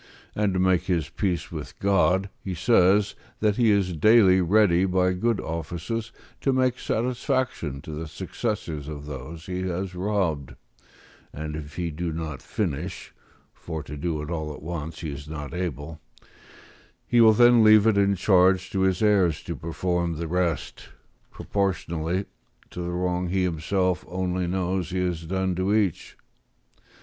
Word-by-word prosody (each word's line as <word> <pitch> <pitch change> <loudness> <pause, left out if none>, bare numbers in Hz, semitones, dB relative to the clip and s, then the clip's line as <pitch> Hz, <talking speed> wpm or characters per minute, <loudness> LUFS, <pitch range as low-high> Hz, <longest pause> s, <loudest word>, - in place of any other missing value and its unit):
And 105 -1 +1
to - - +1
make 95 -1 +2
his 85 -5 0
peace 90 0 -2
with 80 -3 -7
God, 95 0 +2
he 95 -2 -4
says, 100 +1 +3 0.3
that 105 -1 +1
he 120 -3 +4
is 100 -4 +2
daily 95 0 +5
ready 90 -1 +4
by 90 0 +2
good 115 +4 0
offices 85 +8 -4 0.3
to 135 - +1
make 130 -1 +1
satisfaction 120 - -1
to 80 - -8
the 80 +1 -5
successors 80 - -4
of 75 -2 -7
those 75 +3 -8
he 90 0 -3
has 95 +1 -3
robbed, 90 -7 -1 0.8
and 75 0 -5
if 75 -1 -8
he 85 -1 -2
do 85 +2 -3
not 80 -3 -5
finish 90 -11 -4 0.4
(for 80 -2 -6
to 75 - -8
do 75 0 -2
it 75 - -6
all 80 -2 -3
at - - -13
once 80 0 -5
he 80 -3 -4
is 70 +1 -8
not 75 -1 -6
able), 80 -3 -4 1.0
he 120 -1 +4
will 110 -1 +8
then 120 +1 +6
leave 110 -1 +7
it 110 -2 +4
in 100 0 +3
charge 95 0 +3
to 95 - -1
his 95 +2 +2
heirs 95 -6 +3
to - - -5
perform 85 +1 -2
the 85 +1 -4
rest, 90 -1 -2 0.4
proportionably 90 -2 -2 0.5
to 90 - -6
the 85 - -3
wrong 90 0 -1
he 95 +1 +1
himself 90 +2 0
only 90 0 -2
knows 90 0 -1
he 95 - -3
has 90 -3 -2
done 95 +1 0
to 95 +4 +1
each. 100 -6 -1
90 Hz, 160 wpm, -25 LUFS, 80-100 Hz, 1.0 s, will